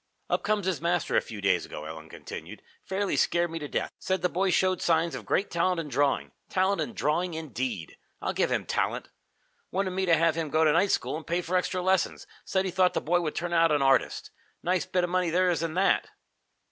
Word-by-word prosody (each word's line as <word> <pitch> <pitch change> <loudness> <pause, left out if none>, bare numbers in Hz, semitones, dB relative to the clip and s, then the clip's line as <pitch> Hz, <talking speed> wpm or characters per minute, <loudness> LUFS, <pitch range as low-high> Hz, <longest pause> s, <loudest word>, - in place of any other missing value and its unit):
"Up - - +2
comes 210 -2 0
his 185 -5 -1
master 170 0 0
a - - +5
few 105 -3 -8
days 95 -3 +2
ago," 75 - -8
Ellen 80 0 -8
continued. - - -9 0.2
"Fairly 195 +1 -1
scared 175 -1 +2
me 165 - -4
to 150 - -5
death. - - -2
Said 185 -2 -1
the 180 - +3
boy 190 +3 +1
showed 185 +1 +2
signs 165 0 +2
of - - -7
great 200 - +1
talent 175 +1 +1
in 155 -3 -4
drawing. 145 0 +1 0.2
Talent 190 +1 +1
in 235 - -3
drawing, 165 +4 0
indeed! 130 - -4 0.2
I'll - - -2
give - - +1
him - - 0
talent! - - -1 0.6
Wanted 190 0 -1
me 190 +1 -1
to 165 - +6
have 165 0 +3
him 160 -1 -3
go 155 +2 +3
to 155 -1 +4
night 185 +5 +3
school - - 0
and 160 - -10
pay 170 +2 0
for 180 +3 -2
extra 180 0 0
lessons. 190 0 +1 0.2
Said 190 0 0
he 190 - -2
thought 180 0 +3
the - - +2
boy 175 +3 +1
would 155 -3 -3
turn 175 +1 -2
out 165 -1 +4
an 145 -2 +3
artist. 135 -1 +2 0.3
Nice 180 -2 0
bit 180 -1 +1
of 175 - -1
money 180 -1 +1
there 180 +2 +3
is 165 - -1
in 165 -1 -2
that!" 195 +2 +2
170 Hz, 235 wpm, -28 LUFS, 155-185 Hz, 0.6 s, to